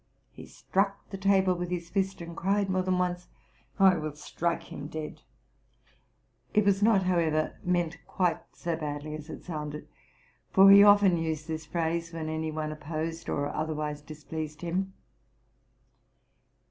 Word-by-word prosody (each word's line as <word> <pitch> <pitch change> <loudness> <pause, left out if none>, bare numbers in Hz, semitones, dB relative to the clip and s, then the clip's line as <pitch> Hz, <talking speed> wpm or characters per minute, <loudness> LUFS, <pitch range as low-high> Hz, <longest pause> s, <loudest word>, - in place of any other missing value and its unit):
He - - -11
struck 195 +1 -1
the 195 - -4
table 190 -1 +3
with 175 0 -4
his 170 -1 -4
fist, 195 -2 -1
and 170 0 -7
cried 195 +2 +1
more 185 0 +2
than 185 0 0
once, 180 -1 -1 0.3
'* - - -33
I 185 - +2
will 155 -2 -4
strike 170 +2 -2
him 145 - -6
dead! 155 0 -6 0.7
"' - - -38
It 210 -1 +4
was 200 0 +3
not, 205 -3 +4
however, 165 -4 +1
meant 175 -2 0
quite 180 -2 +1
so 170 -2 -3
badly 150 -1 -5
as 155 +1 -8
it - - -8
sounded; 150 -3 -5 0.6
for 195 +1 +8
he 200 0 +10
often 205 -3 +6
used 160 -1 -3
this 160 -1 -5
phrase 165 0 -2
when 160 -1 -4
any 160 0 -2
one 155 0 -3
opposed 160 +2 -4
or 145 0 -1
otherwise 150 -1 -3
displeased 155 +1 -7
him. 185 +3 -2
170 Hz, 160 wpm, -29 LUFS, 155-185 Hz, 0.7 s, he